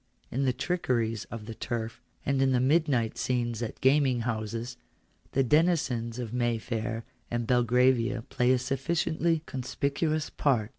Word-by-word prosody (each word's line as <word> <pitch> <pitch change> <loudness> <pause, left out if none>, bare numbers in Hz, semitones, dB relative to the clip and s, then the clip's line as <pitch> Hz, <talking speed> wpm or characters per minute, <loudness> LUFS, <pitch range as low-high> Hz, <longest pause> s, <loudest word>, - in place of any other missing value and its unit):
In 135 +3 0
the 130 - +3
trickeries 120 - -1
of 115 -2 -8
the 115 - -6
turf, 115 0 -4 0.2
and 140 -1 +1
in 135 -1 +3
the 125 - +3
midnight 135 -4 +2
scenes 120 -2 -1
at 115 - -4
gaming 130 -2 +4
houses, 115 +1 -3 0.6
the 135 - +3
denizens 130 -6 +2
of 120 -2 -5
Mayfair 115 -1 -1 0.2
and 120 0 -1
Belgravia 125 0 +3
play 125 +2 +1
a 130 - +5
sufficiently 160 +5 0
conspicuous 140 +4 -1
part. 120 -7 +1
125 Hz, 140 wpm, -29 LUFS, 115-135 Hz, 0.6 s, a